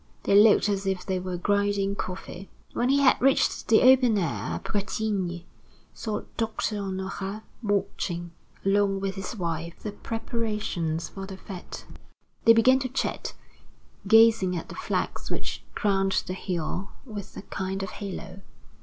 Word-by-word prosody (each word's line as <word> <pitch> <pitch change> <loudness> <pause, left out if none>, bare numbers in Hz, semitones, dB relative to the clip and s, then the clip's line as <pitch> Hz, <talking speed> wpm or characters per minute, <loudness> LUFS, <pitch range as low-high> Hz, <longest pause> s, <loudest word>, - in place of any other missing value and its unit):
They - - +1
looked 210 0 +7
as 195 -1 -1
if 190 -2 -1
they 185 -1 -1
were 180 -1 -4
grinding 200 +1 +1
coffee. 190 0 -6 0.2
When 245 - +1
he 280 +1 +4
had 265 - +5
reached 270 +1 +3
the 225 - +5
open 255 -3 +6
air, 105 - -1
Bretigny 195 -4 -2 0.5
saw 215 -2 -3 0.2
Doctor 220 -1 -1
Honorat 195 +2 -4 0.2
watching, 185 -5 -1 0.3
along 195 0 +3
with 195 0 -2
his 195 +5 -5
wife, 170 -3 -3
the 210 - -3
preparations 210 -8 -2
for 195 0 -7
the 190 -1 -8
fête. 190 -2 -8 0.6
They 230 - +9
began 255 +3 +5
to 260 -1 -3
chat, 260 - -2 0.7
gazing 225 -4 +6
at 165 - -6
the - - -7
flags - - -2
which - - -3
crowned 195 -2 +2
the 185 - -3
hill 185 0 -3 0.2
with 205 -5 -8
a - - -7
kind 195 -1 -3
of 190 - -5
halo. 195 -1 -7
195 Hz, 145 wpm, -27 LUFS, 185-220 Hz, 0.7 s, They